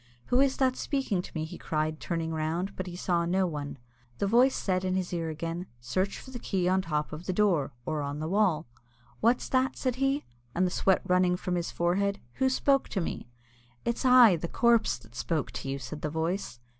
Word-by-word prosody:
"Who 250 Hz, -, +5 dB
is 270 Hz, -1 st, +3 dB
that 260 Hz, -1 st, +2 dB
speaking 265 Hz, -12 st, -1 dB
to -, -, -11 dB
me?" 155 Hz, 0 st, -1 dB
he 160 Hz, -, -9 dB
cried, 155 Hz, 0 st, -1 dB
turning 165 Hz, -2 st, -2 dB
round; 165 Hz, +5 st, -2 dB
but 185 Hz, -, -4 dB
he 175 Hz, -, -6 dB
saw 175 Hz, -1 st, 0 dB
no 185 Hz, +3 st, +2 dB
one. 145 Hz, -4 st, -4 dB, 0.4 s
The -, -, 0 dB
voice 245 Hz, +6 st, +4 dB
said 185 Hz, -1 st, 0 dB
in 185 Hz, 0 st, 0 dB
his 185 Hz, -1 st, -2 dB
ear 165 Hz, -2 st, -1 dB
again, 165 Hz, +3 st, -4 dB
"Search 185 Hz, +12 st, -1 dB
for 260 Hz, -, -11 dB
the 245 Hz, -, -6 dB
key 185 Hz, -5 st, -1 dB
on 190 Hz, +1 st, +3 dB
the 185 Hz, -, -13 dB
top 150 Hz, -1 st, -1 dB
of 155 Hz, +3 st, -7 dB
the 185 Hz, -, 0 dB
door, 180 Hz, -8 st, +2 dB
or 155 Hz, -1 st, -1 dB
on 145 Hz, 0 st, -3 dB
the 155 Hz, +1 st, -3 dB
wall." 185 Hz, -4 st, +2 dB, 0.5 s
"What's 235 Hz, +3 st, +2 dB
that?" 260 Hz, 0 st, +2 dB
said 255 Hz, -2 st, -1 dB
he, 270 Hz, +2 st, +1 dB, 0.3 s
and 185 Hz, -, +3 dB
the 180 Hz, -, 0 dB
sweat 190 Hz, 0 st, +2 dB
running 180 Hz, 0 st, +3 dB
from 180 Hz, -, -3 dB
his 175 Hz, -1 st, -1 dB
forehead; 200 Hz, +4 st, 0 dB, 0.2 s
"who 265 Hz, -, +5 dB
spoke 275 Hz, +1 st, +2 dB
to 195 Hz, -, -1 dB
me?" 165 Hz, -7 st, -4 dB, 0.6 s
"It's 235 Hz, -, -1 dB
I, 250 Hz, -7 st, +7 dB
the 170 Hz, -, -4 dB
corpse, 230 Hz, -, +3 dB
that 115 Hz, -1 st, -18 dB
spoke 150 Hz, +4 st, -2 dB
to 125 Hz, +2 st, -5 dB
you!" 135 Hz, -, -1 dB
said 140 Hz, +3 st, -7 dB
the 155 Hz, -, -1 dB
voice. 160 Hz, -3 st, -2 dB
180 Hz, 220 wpm, -29 LUFS, 160-210 Hz, 0.6 s, I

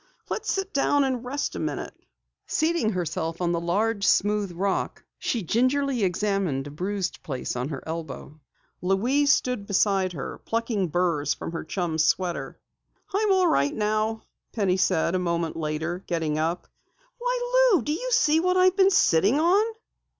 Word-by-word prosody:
"Let's -, -, -2 dB
sit 390 Hz, 0 st, -2 dB
down 285 Hz, +1 st, +3 dB
and 260 Hz, -3 st, -1 dB
rest 275 Hz, +3 st, -3 dB
a -, -, -4 dB
minute." -, -, -3 dB, 0.5 s
Seating 315 Hz, -9 st, +1 dB
herself 165 Hz, -2 st, -3 dB
on 175 Hz, -1 st, 0 dB
the 170 Hz, -, 0 dB
large 200 Hz, +5 st, 0 dB
smooth 205 Hz, 0 st, +2 dB
rock, 190 Hz, +3 st, -2 dB, 0.2 s
she 230 Hz, -5 st, -1 dB
gingerly 255 Hz, -, +1 dB
examined 190 Hz, -7 st, 0 dB
a 145 Hz, -, -8 dB
bruised 185 Hz, +4 st, -3 dB
place 135 Hz, -9 st, -4 dB
on 125 Hz, +3 st, -2 dB
her 140 Hz, -4 st, -6 dB
elbow. 155 Hz, -2 st, -7 dB, 0.4 s
Louise 245 Hz, +11 st, +2 dB
stood 250 Hz, -8 st, 0 dB
beside 195 Hz, -2 st, +2 dB
her, 140 Hz, -, -6 dB
plucking 225 Hz, -4 st, -1 dB
burs 165 Hz, -4 st, 0 dB
from -, -, -6 dB
her 165 Hz, -, -4 dB
chum's 160 Hz, -2 st, -1 dB
sweater. 180 Hz, +1 st, -1 dB, 0.6 s
"I'm 415 Hz, +1 st, +2 dB
all 375 Hz, -1 st, +4 dB
right 140 Hz, -, +2 dB
now," 215 Hz, +1 st, -1 dB, 0.3 s
Penny 195 Hz, -4 st, +1 dB
said 170 Hz, -2 st, +1 dB
a 185 Hz, -, +1 dB
moment 170 Hz, -2 st, -1 dB
later, 160 Hz, +3 st, -3 dB
getting 160 Hz, -3 st, -1 dB
up. 165 Hz, +3 st, -2 dB, 0.5 s
"Why, -, -, +2 dB
Lou! -, -, +1 dB
Do 295 Hz, -, -1 dB
you -, -, -3 dB
see 315 Hz, -8 st, +4 dB
what 365 Hz, +2 st, +1 dB
I've 370 Hz, 0 st, +4 dB
been 385 Hz, 0 st, +5 dB
sitting 215 Hz, -, +3 dB
on?" 360 Hz, +6 st, +4 dB
195 Hz, 160 wpm, -25 LUFS, 170-275 Hz, 0.6 s, been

